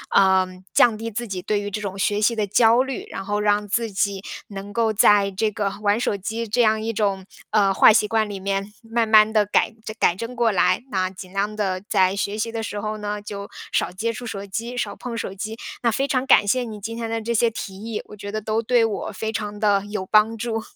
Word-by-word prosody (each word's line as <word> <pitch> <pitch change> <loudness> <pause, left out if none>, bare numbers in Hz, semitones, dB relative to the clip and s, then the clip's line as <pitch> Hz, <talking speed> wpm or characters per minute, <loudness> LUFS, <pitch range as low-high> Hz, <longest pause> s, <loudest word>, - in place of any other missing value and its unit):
嗯， 185 -1 +3
降 235 -3 +5
低 225 +1 -5
自 235 +2 -4
己 185 -3 -4
对 210 +2 0
于 205 0 -5
这 210 - -3
种 195 -1 -5
学 205 +2 0
习 230 +2 +3
的 210 -2 0
焦 230 +4 +4
虑。 270 +9 -5
然 - - -4
后 205 +1 -1
让 210 0 +2
自 220 +1 -1
己 195 0 0 0.3
能 200 0 -8
够 230 -1 +2
在 200 -1 +4
这 215 +3 0
个 200 -1 -2
玩 205 +1 +2
手 210 -4 -1
机 225 +4 -4
这 240 +3 -1
样 215 -1 +2
一 225 +1 -2
种， 200 -3 -1 0.3
呃， 200 -2 +3
坏 215 - +7
习 210 -1 +2
惯 220 -1 +1
里 195 -2 -6
面 195 +1 -2
慢 225 0 -1
慢 215 0 +6
地 210 -2 +3
改 205 - +2 0.2
正 220 - -6
改 175 - +3
正 235 +3 -6
过 230 -1 +2
来。 185 +3 +2
那 185 -1 0
尽 185 -1 -11
量 205 +2 -1
地 190 -3 -1
在 185 0 +3
学 200 +1 -2
习 230 +1 -2
的 225 0 -3
时 210 - -5
候 215 0 -3
呢， 210 0 -4
就 200 -1 -7 0.2
少 - - +1
接 220 +6 -2
触 245 +2 -7
手 200 -2 -5
机、 230 +5 -5
少 250 - -3
碰 235 -2 -6
手 195 - -4
机。 215 +3 -5 0.3
那 235 - +2
非 270 +5 0
常 255 -1 +1
感 260 -6 +6
谢 250 +4 +1
你 220 -2 -7
今 230 +3 -5
天 230 -1 -4
的 225 0 -2
这 235 +2 -2
些 230 +1 +3
提 195 -3 -7
议， 220 +2 -5
我 210 - -12
觉 200 +1 -7
得 215 - -2
都 220 +2 -1
对 235 0 +3
我 220 -1 -2
非 220 +3 -3
常 210 -1 -4
地 205 -2 +2
有 205 -2 -4
帮 215 +3 +3
助。 225 -1 -2
210 Hz, 265 characters per minute, -23 LUFS, 200-225 Hz, 0.3 s, 坏